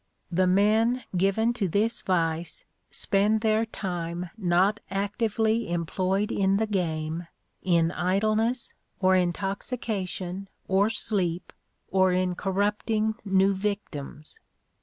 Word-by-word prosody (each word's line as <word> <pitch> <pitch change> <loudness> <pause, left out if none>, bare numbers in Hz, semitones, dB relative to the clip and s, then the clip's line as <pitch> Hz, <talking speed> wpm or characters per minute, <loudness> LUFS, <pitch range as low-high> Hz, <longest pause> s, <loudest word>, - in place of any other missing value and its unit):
The 185 +2 +2
men 220 +6 +3
given 195 +6 +2
to 205 -5 -1
this 215 +6 +1
vice 165 -2 -1 0.2
spend 210 +2 +1
their 220 0 +2
time 175 -4 -4
not 190 +1 +2
actively 220 +2 0
employed 185 +4 0
in 195 0 +2
the 220 - +1
game 165 -4 -2 0.3
in 170 -2 +2
idleness, 215 +7 +1 0.3
or 185 -1 +4
intoxication, 195 0 -2 0.2
or 195 +2 +3
sleep, 185 -6 -1 0.4
or 190 -1 +4
in 180 0 +1
corrupting 210 +4 0
new 195 -1 +3
victims. 190 -7 -5
195 Hz, 105 wpm, -27 LUFS, 180-215 Hz, 0.4 s, or